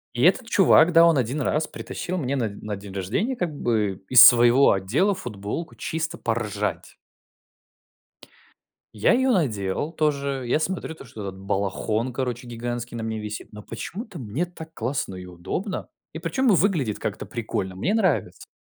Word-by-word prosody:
И 120 - 0
этот 210 +7 +4
чувак, 180 -5 +5
да, 165 -1 +7
он 165 -3 +4
один 130 +4 -1
раз 150 +4 0
притащил 185 +1 -5
мне 140 -4 -1
на 120 -5 0
на 105 +1 -6
день 100 0 -10
рождения 110 - -1
как 180 -8 -2
бы 105 -8 -1
из 125 -2 +10
своего 120 +2 +7
отдела 120 - +1
футболку 125 - -6
чисто 160 0 -3
поржать. 115 -3 -3 2.0
Я 105 - +3
её 260 +1 +3
надел 120 - 0
тоже. 140 -4 -1
Я 125 - +2
смотрю, 165 -1 -3
то 155 - -12
что 110 -3 -10
этот 95 -1 -6
балахон, 100 +5 -1
короче, 125 -1 -3
гигантский 120 0 -5
на 115 - -4
мне 110 0 -3
висит, 105 0 -6
но 105 - -8
почему-то 190 - -7
мне 130 +6 -2
так 160 -2 -11
классно 125 -4 -3
и 90 0 -8
удобно. 90 - -5 0.2
И - - -7
причём 170 +11 0
выглядит 175 - +2
как-то 110 0 -4
прикольно. 100 -5 -4
Мне 175 - 0
нравится. 195 -8 0
125 Hz, 160 wpm, -24 LUFS, 105-165 Hz, 2.0 s, из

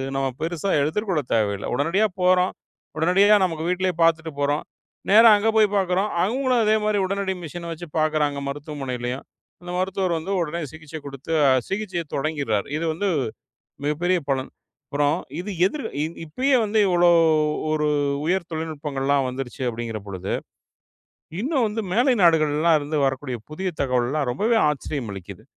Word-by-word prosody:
நம்ம 135 0 0
பெருசா 170 +3 -2
எடுத்துக்கொள்ளத் 155 - -1
தேவையில்ல. 100 -3 0
உடனடியா 165 - +2 0.2
போறோம். 180 0 +3 0.4
உடனடியா 190 +6 +5
நமக்கு 165 -4 -1
வீட்லயே 180 +1 0
பாத்துட்டு 165 -1 +2
போறோம். 145 +1 0 0.5
நேரா 225 +3 +8
அங்க 210 +2 +1
போய் 215 -1 +6
பாக்குறோம். 190 +1 +1
அவங்களும் 250 +4 +1
அதே 215 0 +3
மாரி 210 -1 +1
உடனடி 195 0 -1
மிஷின் 170 +1 -7
வச்சு 170 +1 -7
பாக்குறாங்க 155 -2 +1
மருத்துவமனையிலும். 135 -3 -4 0.4
அந்த 175 0 -7
மருத்துவர் 185 -2 0
வந்து 165 +5 -5
உடனே 170 +1 -2
சிகிச்சை 160 0 -9
குடுத்து 140 +2 -8 0.4
சிகிச்சையத் 190 -6 -3
தொடங்கிர்றாரு. 140 -9 -1
இது 165 - -2
வந்து 200 +6 -2 0.8
மிகப்பெரிய 175 +5 +1
பலன். 130 -1 -1 0.4
அப்புறம் 145 +2 +1 0.2
இது 195 +4 -4
எதிர் 280 +9 -2 0.2
இ - - +1 0.2
இப்பயே 260 - +1
வந்து 215 +1 +1
இவ்ளோ 175 -1 +4 0.6
ஒரு 150 -1 +1 0.4
உயர் 180 +1 0
தொழில்நுட்பங்கள்லாம் 145 -4 -1
வந்துருச்சு 130 0 -6
அப்படிங்கிற 115 -1 -4
பொழுது 95 -1 -4 1.1
இன்னும் 265 +1 +1
வந்து 215 +1 -2
மேலை 245 +6 +4
நாடுகள்லாம் 160 -1 +4
இருந்து 150 +1 -3
வரக்கூடிய 135 -1 -2
புதிய 185 +5 -3
தகவல்லாம் 130 +1 0
ரொம்பவே 215 - +1
ஆச்சரியம் 140 -5 -3
அளிக்குது. 95 -3 -9
160 Hz, 140 wpm, -23 LUFS, 140-190 Hz, 1.1 s, நேரா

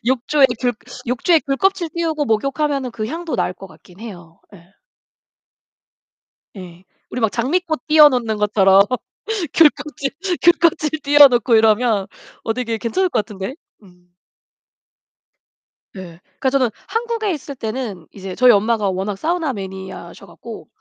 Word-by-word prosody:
욕조에 265 +3 +3
귤 250 -1 +1 0.3
욕조에 280 +7 +2
귤껍질 340 +6 0
띄우고 320 -3 -1
목욕하면은 275 +3 -1
그 215 -2 -4
향도 325 +5 -5
날 - - -1
것 195 - -12
같긴 180 -1 -19
해요. 175 -7 -11
예. 175 - -15 1.9
예, 180 -2 -11 0.3
우리 250 - -5
막 220 - +1
장미꽃 315 - -2
띄워 305 -1 +7
놓는 235 -5 -2
것처럼 200 -2 +4 0.7
귤껍질, 295 -3 +2 0.3
귤껍질 335 -2 +3
띄워 290 0 +7
놓고 240 -2 +1
이러면 220 -2 +2 0.4
어 225 - -1
되게 230 -2 -3
괜찮을 360 - -1
것 245 - 0
같은데? 205 +5 -7 0.3
음. 180 -2 -21 1.9
네. 175 -4 -11 0.2
그러니까 265 - +1
저는 260 -2 +1 0.2
한국에 455 -2 -2
있을 290 -3 -6
때는 220 -7 -5
이제 190 -2 -8
저희 250 -1 +6
엄마가 215 -1 +1
워낙 190 +2 -3
사우나 320 - -1
매니아셔 190 -3 -9
갖고 175 0 -11
240 Hz, 285 characters per minute, -19 LUFS, 195-295 Hz, 1.9 s, 띄워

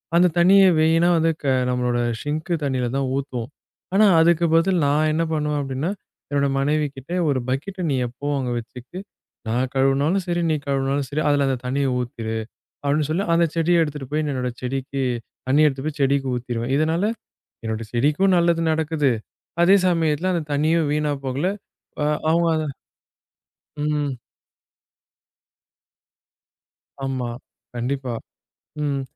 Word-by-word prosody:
அந்த 180 +1 +6
தண்ணியை 190 +2 +6
வீணா 165 +2 +4
வந்து 165 0 +3
க - - -7 0.2
நம்மளோட 125 -1 0 0.2
சிங்க் 155 +4 -3
தண்ணியில 130 -3 0
தான் 135 -1 0
ஊத்துவோம். 125 -4 -4 0.4
ஆனா 215 +2 +5
அதுக்கு 170 +1 +4
பதில் 175 +2 +3
நா 140 - +2 0.2
என்ன 165 +2 +1
பண்ணுவேன் 150 -1 0
அப்டின்னா, 135 +5 -2 0.4
என்னோட 140 -1 +1
மனைவிக்கிட்ட 145 0 -1 0.2
ஒரு 135 - +1
பக்கெட்ட 180 +9 -3
நீ 135 - +1
எப்பவும் 140 +4 -3
அங்க 125 -2 -2
வச்சுட்டு, 125 +8 -10 0.5
நான் 125 +3 0
கழுவுனாலும் 140 +8 +2
சரி 175 0 0
நீ - - +2
கழுவுனாலும் 135 0 0
சரி 150 +2 -1
அதுல 145 -1 +3
அந்தத் 130 -2 -2
தண்ணிய 140 +1 0
ஊத்திரு, 115 -2 -4 0.5
அப்டின்னு 145 +1 +1
சொல்லி 180 +6 0
அந்தச் 165 -1 +2
செடிய 170 +1 +3
எடுத்துட்டு 145 -4 -6
போய் 155 - +1
என்னோட 125 -1 -2
செடிக்கு 135 +1 -3 0.5
தண்ணிய 150 +3 +5
எடுத்துட்டு 135 +1 -2
போய் 150 -1 -10
செடிக்கு 135 0 +2
ஊத்திடுவேன். 120 +1 -3
இதனால, 160 +4 +1 0.6
என்னோட 110 0 -3
செடிக்கும் 150 +10 +2
நல்லது 170 -1 +2
நடக்குது, 155 -3 +1 0.5
அதே 195 +3 +6
சமயத்துல 165 +1 +1
அந்தத் 155 -4 -3
தண்ணியும் 155 +1 +2
வீணா 150 -1 0
போகல. 135 +6 -1 0.6
அ - - +2 0.2
அவுங்க 170 +1 +3
அத 155 - -1 1.1
ம். 145 -3 -1 2.9
ஆமா. 130 -3 -2 0.5
கண்டிப்பா. 125 0 -2 0.7
ம். 140 -2 -1
145 Hz, 135 wpm, -22 LUFS, 130-165 Hz, 2.9 s, அந்த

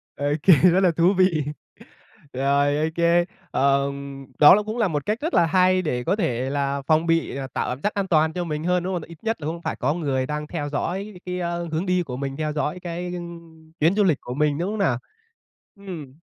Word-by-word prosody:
Ô 145 - -4 0.2
kê, 185 - +8
rất 180 +5 +5
là 185 -3 +4
thú 170 +4 +3
vị. 180 -5 +3 0.9
Rồi, 140 +2 +2
ô 155 - +1
kê. 170 0 +3 0.3
Ờ, 140 0 +2 0.5
đó 150 +4 +9
là 210 - 0
cũng 215 +3 -5
là 220 -4 +2
một 145 -4 -3
cách 215 +5 -1
rất 325 +3 -2
là 170 - +5
hay 185 +1 +3
để 125 -7 -2
có 185 +8 +1
thể 130 - -1
là 140 0 -1
phòng 160 +1 +3
bị, 165 -4 +1
ờ, 135 -1 -4
tạo - - -1
cảm 130 +3 -5
giác 210 - 0
an 200 -1 -2
toàn 160 -2 +2
cho 180 - -2
mình 155 -2 -4
hơn, 180 0 +1
đúng 190 +1 -2
hông? 175 - -2
Tại 165 - -12
ít 165 - -11
nhất 225 -6 -2
là 145 - -4
cũng 170 +2 -4
phải - - -3
có 140 +4 0
người 140 -6 -1
đang 150 +1 -4
theo 150 -3 -4
dõi 195 +8 -3
cái, 180 0 -3
ơ, 170 -1 -3
hướng 165 +4 -1
đi 180 -1 +1
của 125 -6 -6
mình, 135 0 -4
theo 155 -1 -2
dõi 150 +4 -2
cái, 175 0 -5
ưm, 165 -2 -10
chuyến 165 +6 +3
du 210 - +3
lịch 170 -8 +3
của 125 - -6
mình, 150 0 +1
đúng 175 +4 -2
hông 215 - -4
nào? 135 -11 +2 0.8
Ừm. 175 -10 -9
165 Hz, 245 wpm, -23 LUFS, 145-180 Hz, 0.9 s, đó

